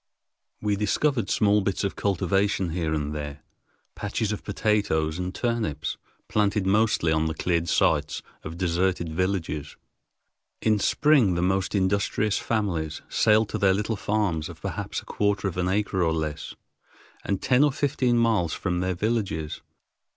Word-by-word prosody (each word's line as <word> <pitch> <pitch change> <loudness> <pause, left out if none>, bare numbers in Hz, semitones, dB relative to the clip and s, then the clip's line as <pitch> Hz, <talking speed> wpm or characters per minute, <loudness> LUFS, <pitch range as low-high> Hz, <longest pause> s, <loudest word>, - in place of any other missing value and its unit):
We 105 -1 +1
discovered 115 +5 0
small 105 0 +3
bits 95 0 -1
of 100 - -1
cultivation 95 -1 0
here 80 -2 -1
and 75 -1 -1
there, 75 -1 -6 0.5
patches 105 +1 -2
of 105 - -4
potatoes 100 -7 0
and 90 0 -2
turnips, 110 - -2 0.3
planted 105 -1 +1
mostly 105 -4 +2
on 80 0 +2
the 80 - -3
cleared 85 -1 0
sites - - +1 0.2
of 80 +2 -7
deserted 85 -2 0
villages. 85 -5 -2 0.8
In 110 -1 +2
spring 130 - +3
the 85 - 0
most 95 +2 0
industrious 100 +2 +1
families 85 -9 -2
sailed 110 0 +3
to - - -3
their 95 -1 +4
little 105 +2 -1
farms 100 -6 -1
of - - -10
perhaps - - -4
a - - -21
quarter 100 -1 0
of 95 - -4
an 90 0 0
acre 95 -1 0
or 80 -1 +2
less, 80 -2 -4 0.7
and 100 -2 -1
ten 130 +2 +3
or 150 - +4
fifteen 130 -3 +1
miles 110 -8 +2
from 90 -2 -2
their 90 0 -1
villages. 100 -7 -2
95 Hz, 150 wpm, -26 LUFS, 85-105 Hz, 0.8 s, their